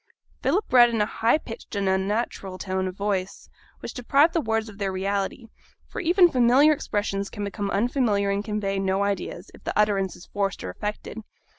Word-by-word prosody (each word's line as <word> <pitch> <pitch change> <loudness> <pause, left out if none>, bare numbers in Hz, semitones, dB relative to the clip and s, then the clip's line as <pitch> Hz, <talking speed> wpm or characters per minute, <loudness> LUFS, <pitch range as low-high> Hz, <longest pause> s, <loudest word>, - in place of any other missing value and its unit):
Philip 405 +4 +1
read 240 -1 +8
in 230 -1 -1
a 210 - +3
high 225 +5 +2
pitched 230 -7 -9
and 200 -1 0
unnatural 190 0 -1
tone 190 0 -2
of 185 - -6
voice, 195 -2 -3 0.3
which - - -6
deprived 280 +6 +3
the 330 - +1
words 225 -3 -1
of 205 -2 -12
their 195 -1 -1
reality; 195 +4 -2 0.4
for - - -5
even 355 +1 +5
familiar 255 +5 +5
expressions 205 -7 -2
can 205 - -6
become 200 0 -3
unfamiliar 205 -2 +1
and 200 +1 -1
convey 210 -2 -2
no 195 +1 +1
ideas, 200 -1 -3
if - - -16
the - - -3
utterance 200 -3 +1
is - - -13
forced 200 -2 -2
or 90 - -4
affected. 210 - -5
205 Hz, 185 wpm, -25 LUFS, 195-235 Hz, 0.4 s, read